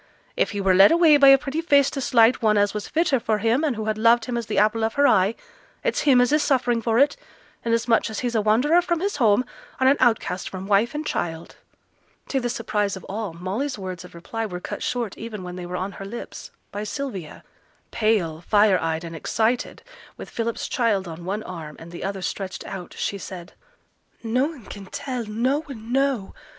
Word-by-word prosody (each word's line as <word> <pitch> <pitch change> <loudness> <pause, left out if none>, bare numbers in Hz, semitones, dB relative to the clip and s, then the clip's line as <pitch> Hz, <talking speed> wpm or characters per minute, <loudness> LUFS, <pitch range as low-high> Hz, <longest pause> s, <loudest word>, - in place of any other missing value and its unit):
If - - +1
he 205 - -4
were 190 -1 +3
led 195 +2 +7
away 330 -3 +6
by 280 -1 +6
a 270 0 +9
pretty 275 +4 -3
face 285 -4 +4
to 275 - -4
slight 235 -1 +4
one 215 -2 +3
as 205 0 +2
was 210 -1 -4
fitter 315 -5 +1
for 225 -2 0
him, 230 +7 +1
and 290 -6 0
who 220 0 -4
had 215 0 -1
loved 230 +1 +4
him 245 - -3
as 235 -2 -3
the - - -3
apple 215 +2 +3
of 220 - -1
her 285 - +4
eye, 195 +4 +3 0.5
it's - - 0
him 255 -2 +6
as 245 +1 +3
is 305 - +4
suffering 245 -5 +1
for 225 0 +1
it, 285 +3 +4 0.5
inasmuch 230 0 +1
as 220 - -4
he's 245 -1 -2
a 220 - +2
wanderer 250 +11 +3
from 345 -1 -1
his 395 -2 -2
home, 235 -1 +3 0.3
and 260 - +3
an 275 +2 +5
outcast 225 -7 +1
from 190 0 -7
wife 205 +7 +2
and 305 +1 -3
child.' 165 - -4 0.7
To 270 - +1
the 245 -1 -2
surprise 210 -4 -1
of 185 - -11
all, 205 -2 -5
Molly's 200 - -3
words 185 -3 -6
of 180 - -14
reply 225 +7 -5
were 180 -5 -4
cut - - -6
short 235 -5 -2
even 220 -4 -6
when 180 0 -7
they 180 -1 -6
were 180 +1 -4
on 185 +2 -3
her 195 - -9
lips, 235 +4 -8 0.2
by 205 +1 -4
Sylvia. 210 - -6 0.5
Pale, 195 -8 0
fire 205 +1 +4
eyed, 160 0 -2
and 165 -1 -7
excited, 225 +8 -1 0.3
with - - -9
Philip's 230 0 -3
child 220 -8 0
on 170 +1 -8
one 205 +4 -3
arm, 160 -5 -8
and 165 +1 -11
the 175 - -7
other 195 -1 -4
stretched 185 +3 -4
out, 185 -3 -8
she 200 - -2
said, 185 -1 -9 0.7
'Noane 255 +3 -1
can 195 -1 -9
tell 250 +2 -4
noane 245 +1 -2
know. 270 -6 0
220 Hz, 210 wpm, -23 LUFS, 195-255 Hz, 0.7 s, a